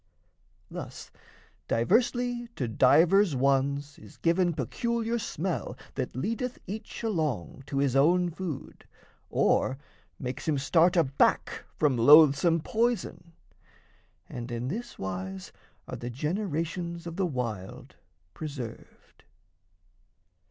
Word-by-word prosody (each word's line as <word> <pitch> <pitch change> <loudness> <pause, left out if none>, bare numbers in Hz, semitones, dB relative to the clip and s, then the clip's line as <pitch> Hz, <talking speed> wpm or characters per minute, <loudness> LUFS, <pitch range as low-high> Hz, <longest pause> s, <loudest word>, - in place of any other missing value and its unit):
Thus, - - -8 0.6
diversly 240 - +1
to 125 - -2
divers 160 - +4
ones 140 +2 +1
is 105 -2 -15
given 175 +1 +2
Peculiar 230 - -1
smell 185 -4 -3 0.2
that - - -4
leadeth 230 - -2
each 215 +3 -7
along 155 - -2
To 140 - -3
his 135 -2 +1
own 175 +5 +4
food 165 -5 -7 0.4
or 130 - +2 0.4
makes 125 +2 -5
him 155 -2 +2
start 165 +7 +3
aback 135 -5 +2
From 145 -5 +2
loathsome 150 +5 +6
poison, 225 -5 -1 0.9
and 120 0 -7
in 120 +2 -3
this 235 - -5
wise 95 0 -5 0.4
are - - -5
The 120 - -5
generations 170 - -3
of 170 -1 -6
the 190 -1 0
wild 115 - -5 0.4
preserved. 140 -7 -9
155 Hz, 105 wpm, -28 LUFS, 130-185 Hz, 0.9 s, loathsome